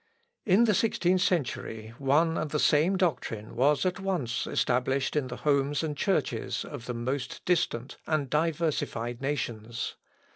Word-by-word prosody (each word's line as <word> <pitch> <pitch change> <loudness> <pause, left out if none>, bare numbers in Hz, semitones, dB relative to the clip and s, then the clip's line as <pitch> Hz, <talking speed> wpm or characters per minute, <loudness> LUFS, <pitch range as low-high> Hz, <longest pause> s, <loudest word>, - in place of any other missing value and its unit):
In 200 +4 +6
the 220 -3 +4
sixteenth 185 -4 +2
century 115 -10 -1
one 150 +4 +3
and 155 -1 -2
the 150 - -1
same 155 +6 +3
doctrine 115 - -1
was 140 +4 +3
at 185 0 0
once 170 -12 -1
established 130 +3 +1
in 145 -4 +1
the 125 - -5
homes 145 0 +1
and 150 -2 -2
churches 195 +5 -1
of 115 - -8
the 125 - -3
most 130 +2 -3
distant 140 -8 0
and 155 -3 +1
diversified 150 -6 -1
nations. 120 -5 -3
145 Hz, 145 wpm, -28 LUFS, 125-165 Hz, -, In